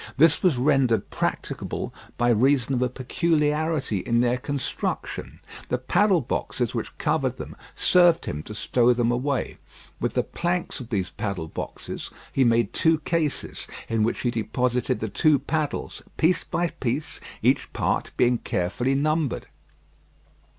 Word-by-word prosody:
This 160 +2 +5
was 175 -8 +3
rendered 130 -5 +2
practicable - - -3 0.2
by 120 - +2
reason 130 +3 +3
of 125 - 0
a 125 - +2
peculiarity 150 - 0
in 115 +5 +1
their 120 +1 +2
construction. 140 +2 -4 0.3
The 125 - +1
paddle 185 - +3
boxes 120 - -2
which - - -4
covered - - 0
them - - -7 0.2
served 175 -2 +4
him 75 - -3
to 105 - -8
stow 120 +2 +3
them 120 -1 +1
away. 130 +3 -1 0.4
With - - -2
the - - +2
planks 175 -1 -2
of 125 -3 -8
these 95 -5 -1
paddle 95 -6 -3
boxes, - - -6 0.2
he 135 - +3
made 115 -1 +2
two 160 0 +4
cases 155 -2 -2 0.2
in 115 -1 0
which 110 +2 0
he 120 - +1
deposited 125 +3 0
the 110 - -1
two 150 - +3
paddles, 155 0 -3 0.2
piece 175 +3 +3
by 175 0 -1
piece, 135 +2 -3 0.2
each - - +2
part - - 0
being 120 -1 +3
carefully 115 +7 -1
numbered. 155 0 0
130 Hz, 145 wpm, -25 LUFS, 120-155 Hz, 0.4 s, This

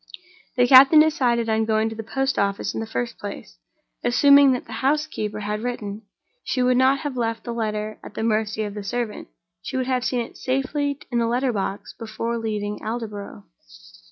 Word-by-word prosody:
The 245 -1 +4
captain 270 +4 +8
decided 250 -7 +2
on 220 0 +1
going 220 0 +1
to 225 - -7
the 225 - -5
post 270 +5 -1
office, 200 0 -1
in - - -3
the 225 - -4
first 235 +1 -4
place. 130 - -8 0.5
Assuming 280 +2 +6
that 250 - -4
the - - -13
housekeeper 270 -7 -1
had 210 +1 -3
written, 220 -4 -4 0.4
she 255 - 0
would 250 0 +3
not 265 +2 +3
have 290 -4 -4
left 230 -2 -2
the 235 - -5
letter 215 -1 -3
at - - -11
the - - -3
mercy 220 -1 0
of 205 -1 -5
the 205 -1 -6
servant—she - - -6
would 260 - 0
have 255 -1 0
seen 250 -1 0
it 230 - -8
safely 280 +2 -1
in 240 - +1
the 230 - +1
letter 250 +2 0
box 195 -1 -4
before 230 +1 -3
leaving 210 -2 -3
Aldborough. 215 - -6
230 Hz, 185 wpm, -23 LUFS, 210-255 Hz, 0.5 s, captain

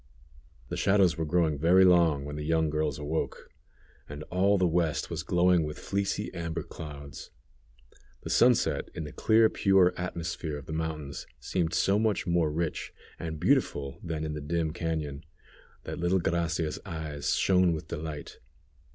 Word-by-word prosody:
The - - -3
shadows 95 -3 +3
were 80 - -2
growing 80 -3 +1
very 90 +4 +6
long 85 -6 +4
when 75 0 -6
the 75 - -4
young 80 0 +1
girls 75 -2 -1
awoke, 75 +2 -4 0.6
and 75 +1 -7
all 100 +3 +3
the 90 - +2
west 85 -2 0
was - - -2
glowing 90 -1 +3
with 75 0 -5
fleecy 100 0 -2
amber 85 -1 -4
clouds. 70 -3 -9 0.9
The - - -4
sunset 120 -1 +3
in - - -4
the 75 - -7
clear 110 0 +4
pure 95 -4 +3
atmosphere 85 -3 -4
of 70 - -10
the 80 - -6
mountains 80 -3 -4
seemed 85 -4 -1
so 100 +4 +3
much 110 -2 +1
more 85 -3 +1
rich 80 +1 -3 0.3
and 80 -2 -5
beautiful 85 - +1
than 80 -2 -3
in 75 -1 -3
the 75 - -5
dim 80 +1 -1
cañon, 80 -5 -3 0.6
that - - -6
little 85 +2 +2
Gracia's 85 -2 -1
eyes 80 -6 -3
shone 90 -2 +3
with 80 0 -4
delight. 80 -2 -6
80 Hz, 160 wpm, -29 LUFS, 75-90 Hz, 0.9 s, very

